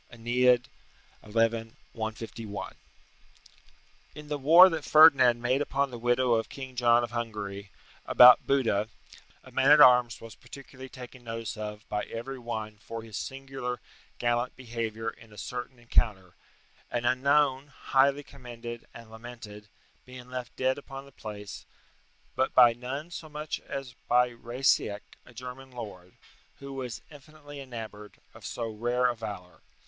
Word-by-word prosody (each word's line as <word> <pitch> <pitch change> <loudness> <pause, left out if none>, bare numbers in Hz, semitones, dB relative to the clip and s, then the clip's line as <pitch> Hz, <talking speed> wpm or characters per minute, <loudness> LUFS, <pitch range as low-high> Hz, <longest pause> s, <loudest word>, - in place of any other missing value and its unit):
AEneid, 125 +1 +2
xi. 135 - -24 0.6
151.] 115 -1 -3 1.4
In 150 -1 -10
the 150 - -1
war 165 +7 +9
that 160 -4 -3
Ferdinand 140 -7 +7
made 130 +3 +1
upon 140 -1 0
the 120 - -7
widow 120 +1 +2
of 115 -1 0
King 130 -2 -8
John 120 -1 +4
of 120 - -4
Hungary, 105 -4 -5 0.4
about 125 0 +8
Buda, 115 -6 +1 0.5
a - - -15
man 135 - +2
at 150 +1 +8
arms 125 -4 +6
was 115 -1 -11
particularly 130 -1 -12
taken 125 -1 -11
notice 115 -1 -5
of 105 0 -7
by 105 0 -2
every 130 +4 -6
one 110 -3 -5
for 115 +1 -7
his 110 -2 -10
singular 135 -2 -5 0.4
gallant 120 +1 0
behaviour 115 -3 -5
in 115 -1 -7
a 105 - -15
certain 125 +3 -6
encounter; 105 -6 0 0.6
and, 120 0 -2
unknown, 135 +2 +2
highly 140 0 +1
commended, 120 -4 -9
and 115 -1 -12
lamented, 110 -2 -10 0.4
being 125 0 -11
left 125 -1 -6
dead 130 +1 0
upon 135 -1 -9
the 140 - -16
place: 105 -5 -8 0.7
but 130 +1 0
by 120 -2 +8
none 135 +7 -6
so 160 -2 -8
much 150 +1 -5
as 135 -3 -5
by 125 +1 +4
Raisciac, 120 -3 0 0.2
a 120 - -15
German 125 +2 -9
lord, 100 -8 -9 0.4
who 140 0 -9
was 125 -3 -6
infinitely 145 0 -12
enamoured 110 -6 -9 0.2
of - - -15
so 115 - -4
rare 120 +3 -1
a 125 -1 +2
valour. 100 -5 -8
120 Hz, 145 wpm, -28 LUFS, 115-135 Hz, 1.4 s, war